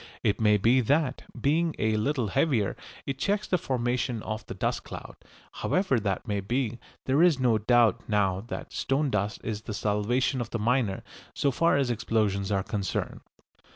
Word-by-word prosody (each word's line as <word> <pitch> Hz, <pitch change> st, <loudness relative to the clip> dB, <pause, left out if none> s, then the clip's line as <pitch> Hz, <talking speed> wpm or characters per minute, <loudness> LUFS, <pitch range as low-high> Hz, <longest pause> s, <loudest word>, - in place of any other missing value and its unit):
It 105 Hz, -, +1 dB
may 105 Hz, -1 st, +5 dB
be 115 Hz, +6 st, +4 dB
that, 140 Hz, +2 st, +1 dB
being 160 Hz, +6 st, +1 dB
a 110 Hz, 0 st, +1 dB
little 120 Hz, 0 st, 0 dB
heavier, 115 Hz, -4 st, +1 dB, 0.3 s
it 135 Hz, -1 st, -4 dB
checks 205 Hz, +6 st, 0 dB
the 180 Hz, -, +1 dB
formation 120 Hz, -3 st, -1 dB
of 110 Hz, 0 st, -4 dB
the -, -, -6 dB
dust -, -, -1 dB
cloud. -, -, -9 dB, 0.4 s
However 185 Hz, -10 st, +1 dB
that 100 Hz, +1 st, -2 dB
may 100 Hz, -2 st, 0 dB
be, 120 Hz, +3 st, -2 dB, 0.3 s
there 135 Hz, +4 st, +3 dB
is 170 Hz, -6 st, +5 dB
no 120 Hz, -4 st, +3 dB
doubt 120 Hz, +1 st, +3 dB
now 100 Hz, -3 st, +1 dB
that -, -, -6 dB
stone 140 Hz, +1 st, 0 dB
dust 105 Hz, +1 st, -1 dB
is 105 Hz, -2 st, -3 dB
the 110 Hz, -2 st, -6 dB
salvation 120 Hz, +6 st, 0 dB
of 120 Hz, -, -4 dB
the -, -, -2 dB
miner 115 Hz, -3 st, 0 dB, 0.3 s
so 140 Hz, -, +1 dB
far 165 Hz, +4 st, +3 dB
as 135 Hz, -3 st, +1 dB
explosions 105 Hz, -3 st, 0 dB
are 95 Hz, -1 st, +1 dB
concerned. 100 Hz, -2 st, -3 dB
120 Hz, 175 wpm, -27 LUFS, 105-135 Hz, 0.4 s, may